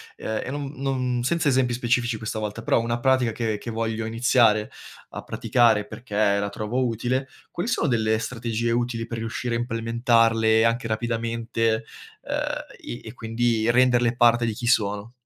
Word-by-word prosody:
ehm, 110 0 -3
e - - -5
non 140 -1 -4
non, 130 -2 -1
senza 160 +4 +1
esempi 130 -2 +2
specifici 120 0 0
questa 110 0 -4
volta, 105 +1 -4
però - - +2
una 115 +1 -1
pratica 130 -2 +2
che 110 -2 -2
che 115 - -8
voglio 110 0 -2
iniziare 115 -1 +3 0.4
a - - -7
praticare 110 -4 +2
perché 110 0 -10 0.3
la 100 - -1
trovo 110 +5 -2
utile, 125 +4 -1 0.2
quali 175 - -3
sono 160 - +1
delle 110 -2 +2
strategie 115 -1 -2
utili 120 -1 -1
per 115 - -5
riuscire 115 +1 -3
a - - +1
implementarle 115 -1 +2
anche 115 0 0
rapidamente, 115 0 -1 0.4
ehm, - - -5 0.5
e - - -7
e - - -8
quindi 115 -1 0
renderle 120 -1 +3
parte 120 0 +4
di 115 - -1
chi 120 - -6
sono? 105 -2 +1
115 Hz, 165 wpm, -24 LUFS, 110-120 Hz, 0.5 s, parte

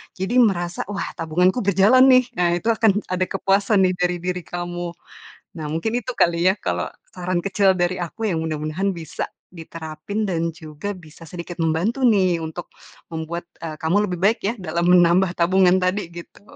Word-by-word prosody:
jadi 190 +6 -3
merasa, 175 -4 0
"Wah, 200 - -3
tabunganku 180 +7 +1
berjalan 200 +6 +5
nih." 255 0 +6
Nah 175 -1 +2
itu 175 - -4
akan 215 -2 +3
ada 185 0 0
kepuasan 195 +2 +1
nih 185 0 +3
dari 180 -1 0
diri 180 -1 -2
kamu. 175 +1 -5 0.7
Nah, - - -4
mungkin 165 +9 -2
itu 250 +3 -5
kali 170 +1 +3
ya, - - +3
kalau 90 - -2 0.3
saran 180 0 -2
kecil 195 -1 +2
dari 175 +1 0
aku 215 +6 -3
yang 160 - -1
mudah-mudahan 160 +4 -2
bisa 160 -2 -5 0.3
diterapin 165 +4 -6
dan 170 -3 -1
juga 160 +5 -6
bisa 165 0 -14
sedikit 175 0 -8
membantu 170 +11 0
nih 185 -6 +3
untuk 160 +2 -6 0.5
membuat, 165 +2 -5 0.2
eee, 155 -2 -5
kamu 195 +5 +1
lebih 180 - -3
baik 210 +4 +3
ya 225 - 0
dalam 170 0 -1
menambah 180 +1 +5
tabungan 185 +1 +4
tadi, 185 0 -1
gitu. 170 +2 -12
180 Hz, 170 wpm, -22 LUFS, 165-195 Hz, 0.7 s, nih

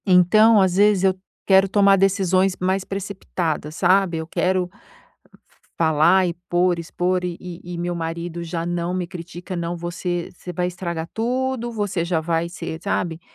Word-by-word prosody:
Então 210 +4 +6
às 190 -2 +2
vezes 205 -2 +4
eu 190 -1 +3 0.3
quero 195 0 +5
tomar 200 0 +5
decisões 190 -1 +2
mais 185 +1 0
precipitadas, 180 -6 -4
sabe. 185 -1 +3
Eu 160 0 -5
quero 180 +1 0 1.1
falar 165 +4 +4
e 170 - -2 0.2
por, 175 0 +2
expor 180 +2 -1
e 175 -1 -3
e 175 0 -8
e - - -5
meu 175 +1 -2
marido 170 +1 -4
já 165 0 -4
não 175 0 -2
me 180 -1 -2
critica, 175 +1 -8
não 170 0 -3
você 175 0 -3
você 180 0 -9
vai 180 +1 -1
estragar 170 -2 -4
tudo, 245 +1 -1
você 205 -6 -2
já 170 -2 0
vai 165 +1 -1
ser 160 -1 -6
sabe. 170 -5 -2
180 Hz, 160 wpm, -22 LUFS, 170-190 Hz, 1.1 s, Então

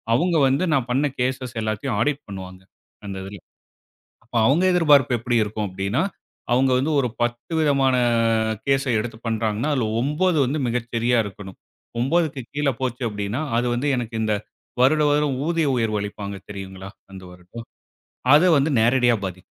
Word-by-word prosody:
அவங்க 175 +6 +1
வந்து 135 +6 +1
நான் 130 -4 0
பண்ண 135 +4 +2
கேஸஸ் 130 0 -2
எல்லாத்தையும் 110 +2 -2
ஆடிட் 145 +5 0
பண்ணுவாங்க 95 -2 -9 0.4
அந்த 100 -1 -6
இதுல. 100 +1 -9 0.8
அப்ப 115 +1 -14
அவங்க 155 +7 +3
எதிர்பார்ப்பு 145 -8 +4
எப்படி 120 +1 0
இருக்கும் 105 0 -3
அப்படின்னா, 95 +5 -1 0.5
அவங்க 130 +1 +3
வந்து 145 +5 0
ஒரு 130 - +1
10 120 +4 -2
விதமான 140 -4 +2 0.7
கேஸ 135 0 +2 0.2
எடுத்துப் 115 +1 -7
பண்றாங்கன்னா, 110 +3 -1
அதுல 125 -6 0
9 155 +6 +1
வந்து 135 +5 -1
மிகச் 120 0 -2
சரியா 120 +1 +2
இருக்கணும். 95 -1 -10 0.4
9க்கு 140 -1 0
கீழ 145 -1 +1
போச்சு 125 -1 -2
அப்படின்னா, 105 +5 -3 0.2
அது 120 +1 +1
வந்து 130 +5 -1
எனக்கு 120 -2 -4
இந்த 110 -1 +1 0.5
வருடா 150 +4 +4
வருடம் 145 -2 +1
ஊதிய 165 -2 +1
உயர்வு 110 -3 0
அளிப்பாங்க 100 0 -6
தெரியுங்களா? 95 -1 -8 0.2
அந்த 95 -1 -10
வருடம். 90 +6 -11 0.7
அதை 165 +5 +6
வந்து 140 +3 +1
நேரடியா 120 +1 +3
பாதிக்கும். 90 -1 -6
120 Hz, 155 wpm, -22 LUFS, 105-140 Hz, 0.8 s, அதை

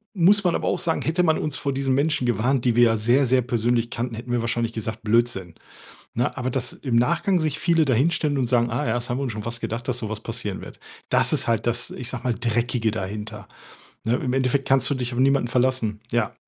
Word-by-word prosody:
muss 200 +3 +5
man 175 -2 +2
aber - - -1
auch - - +1
sagen, 160 - 0
hätte 170 +3 +1
man 160 -2 +2
uns 150 -2 -2
vor 140 - -2
diesen 135 -1 0
Menschen 140 -3 +1
gewarnt, 120 +2 +1
die 120 -2 +3
wir 120 - +6
ja 115 -1 +4
sehr, 120 +6 +3
sehr 125 0 +3
persönlich 120 -1 0
kannten, 120 0 -4
hätten 120 +2 -7
wir 120 -1 +1
wahrscheinlich 115 0 -1
gesagt: 110 0 -5
„Blödsinn.“ 105 -6 +1 0.6
Ne, 120 +2 0
aber 130 0 -1
dass 125 -1 -1
im 130 -4 -3
Nachgang 170 +9 +2
sich 155 -2 -1
viele 165 -3 +3
da 130 - +2
hinstellen 150 +3 +1
und 125 - +1
sagen: 120 -1 +2
„Ah 125 +6 -1
ja, - - +1
das 120 0 -3
haben 120 - -1
wir - - -2
uns 125 -4 -3
schon 105 0 -6
fast 115 +1 -4
gedacht, 115 +1 -4
dass 125 -1 -1
so 110 - -4
was 110 0 -5
passieren 115 -4 -4
wird.“ - - -11 0.3
Das - - +3
ist - - 0
halt 115 -1 0
das, 120 +1 -1
ich 125 - -6
sag 130 -1 -6
mal, 125 -2 +1
Dreckige 115 0 0
dahinter. 105 0 -6 0.6
Ne, 115 - +2
im 125 -2 -2
Endeffekt 135 +1 +1
kannst 135 -1 +3
du - - +1
dich 125 -1 -3
auf - - -5
niemanden 135 -1 +3
verlassen. 120 -4 0
Ja. 115 -3 0
120 Hz, 250 wpm, -23 LUFS, 115-135 Hz, 0.6 s, wir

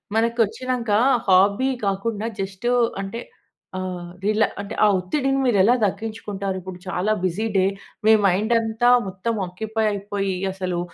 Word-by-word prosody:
మనకు 230 +1 +1
వచ్చినాక 250 +2 -4 0.4
హాబీ 200 +7 +4 0.2
కాకుండా 205 +2 -2 0.2
జస్ట్ 190 +4 -5 0.4
అంటే 195 +4 -5 0.6
ఆహ్, 180 -2 -5
రిలా 215 +1 +3 0.2
అంటే 200 - -7
ఆ - - +7
ఒత్తిడిని 270 +9 0
మీరు 240 -5 +3
ఎలా 220 +6 +5
తగ్గించుకుంటారు. 205 -2 -3
ఇప్పుడు 185 0 -8
చాలా 185 +3 -1
బిజీ 185 +4 -1
డే 185 - +4 0.4
మీ 220 - +7
మైండ్ 200 +5 +2
అంతా 225 +2 +1 0.2
మొత్తం 190 +5 -3
ఆక్యుపై 220 +5 -3
అయిపోయి 200 -1 -2 0.2
అసలు 185 -2 -3
200 Hz, 135 wpm, -22 LUFS, 190-225 Hz, 0.6 s, ఆ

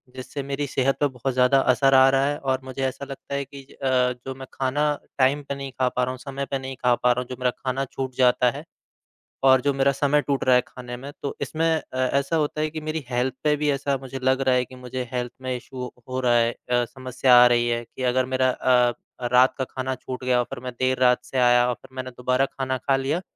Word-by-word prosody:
जिससे 130 +2 -6
मेरी 140 +1 -3
सेहत 135 0 +1
पे 145 - +3
बहुत 130 0 -4
ज़्यादा 125 +2 +4
असर 135 +2 +3
आ 130 0 +7
रहा 135 0 +2
है 145 +1 -1
और 130 -2 -1
मुझे 130 +1 -6
ऐसा 135 +2 -4
लगता 135 0 -9
है 140 - -2
कि 140 +1 -11
ज - - -15
अ, 125 -1 +2
जो 135 0 -5
मैं 130 0 -9
खाना 135 +2 0 0.3
टाइम 140 +2 +3
पे 140 - -2
नहीं 140 -1 -6
खा 130 - +3
पा 125 - -1
रहा 125 - -1
हूँ, 130 - -7
समय 140 +1 -5
पे 135 - 0
नहीं 130 0 -6
खा 125 0 +4
पा 125 +1 +2
रहा 125 +1 0
हूँ, 125 - -8
जो 125 - -5
मेरा 125 -1 +1
खाना 135 +1 -2
छूट 130 0 -5
जाता 125 -1 +4
है। 145 +4 -8 0.8
और 130 -1 +6
जो 140 +2 +1
मेरा 135 0 +3
समय 145 +2 +2
टूट 140 -2 -1
रहा 130 - +5
है, 125 - +5
खाने 125 -1 -8
में, 135 +3 -8
तो 140 - -3
इसमें 165 +1 -1
अ, 130 - -8
ऐसा 140 +4 +1
होता 150 0 0
है 155 - 0
कि 155 0 -6
मेरी 155 0 -3
हेल्थ 125 +1 0
पे 150 -1 +3
भी 150 0 0
ऐसा 140 0 -1
मुझे 135 0 -7
लग 130 +1 +2
रहा 130 -1 +3
है, 125 0 +1
कि 130 - -14
मुझे 125 0 -6
हेल्थ 125 -1 -2
में 130 -1 -2
इश्यू 125 0 -7 0.2
हो 130 0 -2
रहा 125 -2 +2
है 115 0 +3
अ, 120 0 -1
समस्या 130 0 +2
आ - - +8
रही 120 0 +2
है 120 0 -1
कि 130 - -8
अगर 130 +1 +1
मेरा 130 0 +3
अ, 125 -1 +3 0.4
रात 125 +1 +5
का 135 - -1
खाना 130 0 -3
छूट 130 0 -7
गया 125 -1 +2
और 125 - +1
फिर - - -6
मैं 125 - -4
देर 130 0 +1
रात 125 -1 +3
से 125 +2 -5
आया 120 0 +5
और - - +1
फिर 130 - -17
मैंने 130 0 -5
दोबारा 125 +2 +1
खाना 130 -1 -3
खा 135 +2 +1
लिया, 140 +6 -1
130 Hz, 260 wpm, -24 LUFS, 125-135 Hz, 0.8 s, आ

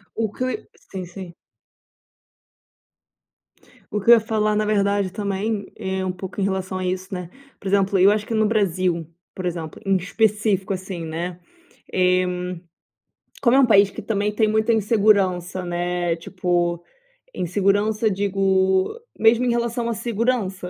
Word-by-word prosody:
O 220 -2 -1
que 255 - -3 0.2
sim, 190 -2 -5
sim. 175 0 -9 2.6
O 210 - +1
que 205 - -7
eu - - +12
ia 230 - +4
falar, 215 -1 0
na 215 - +1
verdade, 200 -2 +1
também 205 +1 -2
é 190 0 -3
um 185 - -1
pouco 185 +2 -6
em - - +1
relação 190 -1 -2
a 185 - -3
isso, 185 +1 -3
né, 180 -2 -5 0.3
por 195 - -5
exemplo, 195 0 +2
eu 195 +2 +6
acho 210 0 0
que - - -5
no 220 -1 +2
Brasil, 185 -6 0 0.3
por 185 - -6
exemplo, 165 -3 -4
em 195 -1 +2
específico, 205 0 0
assim, 185 -2 -5
né, 170 +2 -4 0.5
eh, 185 0 +3 1.2
como 245 -1 +4
é 275 - +6
um 270 - +6
país 200 -4 +5
que - - -8
também 210 0 -1
tem 220 - +3
muita 220 +2 +2
insegurança, 200 -4 +2
né, 175 -1 -1
tipo, 175 -1 -1 0.5
insegurança, 205 +4 +1
digo 190 -1 +1 0.3
mesmo 230 +3 +4
em 245 - +2
relação 235 0 -1
à 235 - 0
segurança, 225 -5 -1
195 Hz, 150 wpm, -22 LUFS, 185-215 Hz, 2.6 s, eu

